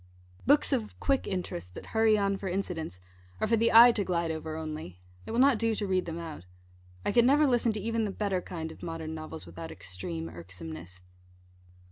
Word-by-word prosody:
Books 290 Hz, 0 st, +5 dB
of 230 Hz, -5 st, -2 dB
quick 275 Hz, -1 st, +1 dB
interest, 90 Hz, -, -4 dB
that -, -, -8 dB
hurry 220 Hz, -1 st, +4 dB
on 200 Hz, -1 st, +1 dB
for 195 Hz, 0 st, -5 dB
incidents, 175 Hz, -, -3 dB, 0.4 s
are -, -, +1 dB
for 230 Hz, +2 st, +3 dB
the 230 Hz, +1 st, +3 dB
eye 235 Hz, +2 st, +10 dB
to 210 Hz, -3 st, -1 dB
glide 170 Hz, -3 st, 0 dB
over 160 Hz, 0 st, -4 dB
only. 155 Hz, -, -6 dB, 0.3 s
It -, -, -4 dB
will 230 Hz, -, -1 dB
not 260 Hz, -2 st, +5 dB
do 225 Hz, -1 st, +1 dB
to 210 Hz, -, -2 dB
read 185 Hz, -1 st, +1 dB
them 165 Hz, -1 st, -5 dB
out. 165 Hz, -, -7 dB, 0.6 s
I -, -, +2 dB
could 235 Hz, +3 st, +5 dB
never 285 Hz, +5 st, +5 dB
listen 240 Hz, -3 st, +3 dB
to 215 Hz, -, -3 dB
even 225 Hz, +2 st, 0 dB
the -, -, -2 dB
better 195 Hz, -2 st, -1 dB
kind 160 Hz, -3 st, -6 dB
of -, -, -13 dB
modern 165 Hz, -1 st, -5 dB
novels 160 Hz, 0 st, -7 dB
without 85 Hz, -1 st, -8 dB
extreme 85 Hz, -3 st, -5 dB
irksomeness. 85 Hz, +1 st, -9 dB
180 Hz, 200 wpm, -29 LUFS, 155-225 Hz, 0.6 s, eye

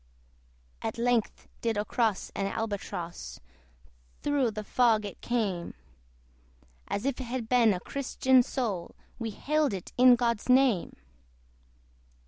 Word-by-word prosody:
At -, -, -3 dB
length 235 Hz, -1 st, 0 dB
did 225 Hz, -2 st, 0 dB
cross 225 Hz, -6 st, 0 dB
an 195 Hz, -, -1 dB
Albatross: 200 Hz, -5 st, -5 dB, 0.8 s
Thorough 285 Hz, -4 st, +2 dB
the 215 Hz, 0 st, -5 dB
fog 225 Hz, -1 st, +2 dB
it 200 Hz, -, -8 dB
came; 205 Hz, -8 st, -2 dB, 1.1 s
As 200 Hz, -, -3 dB
if 275 Hz, -1 st, -1 dB
it -, -, -5 dB
had 240 Hz, -1 st, -4 dB
been 235 Hz, -2 st, +4 dB
a 185 Hz, -, -1 dB
Christian 260 Hz, +1 st, +2 dB
soul, 225 Hz, -9 st, -3 dB, 0.2 s
We 230 Hz, -1 st, -3 dB
hailed 295 Hz, +2 st, 0 dB
it 185 Hz, -, -8 dB
in 250 Hz, -1 st, +8 dB
God's 235 Hz, -1 st, -1 dB
name. 250 Hz, -7 st, +3 dB
235 Hz, 120 wpm, -29 LUFS, 205-255 Hz, 1.1 s, in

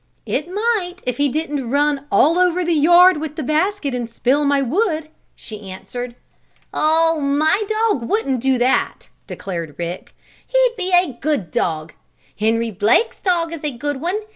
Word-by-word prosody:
"It 300 Hz, +5 st, -2 dB
might, 400 Hz, -4 st, -1 dB
if 250 Hz, -1 st, -2 dB
he 285 Hz, 0 st, +2 dB
didn't 290 Hz, -3 st, -3 dB
run 285 Hz, +1 st, +1 dB
all 330 Hz, +5 st, +4 dB
over 360 Hz, 0 st, +2 dB
the 340 Hz, -, +1 dB
yard 345 Hz, +3 st, +6 dB
with 305 Hz, 0 st, -5 dB
the 310 Hz, -, -4 dB
basket, 310 Hz, +1 st, 0 dB
and 240 Hz, -2 st, -3 dB
spill 260 Hz, +5 st, +1 dB
my 280 Hz, 0 st, +3 dB
wood," 310 Hz, -, -1 dB, 0.3 s
she 210 Hz, -3 st, -9 dB
answered. 240 Hz, +6 st, -7 dB, 0.6 s
"Oh, 325 Hz, +1 st, +2 dB
my 290 Hz, +7 st, +1 dB
dog 435 Hz, -, 0 dB
wouldn't 275 Hz, -, 0 dB
do 265 Hz, 0 st, +2 dB
that!" 250 Hz, +2 st, 0 dB, 0.2 s
declared 170 Hz, -6 st, -6 dB
Rick. 175 Hz, +1 st, -6 dB, 0.3 s
"He'd -, -, +2 dB
be 375 Hz, -3 st, -3 dB
a 355 Hz, -7 st, +3 dB
good 275 Hz, -, -1 dB
dog. 155 Hz, -1 st, -2 dB, 0.5 s
Henry 225 Hz, +1 st, +1 dB
Blake's 215 Hz, -, +1 dB
dog 340 Hz, -3 st, 0 dB
is 325 Hz, -, -7 dB
a 300 Hz, -, 0 dB
good 275 Hz, +2 st, -4 dB
one. 360 Hz, +5 st, -1 dB
295 Hz, 165 wpm, -19 LUFS, 245-355 Hz, 0.6 s, yard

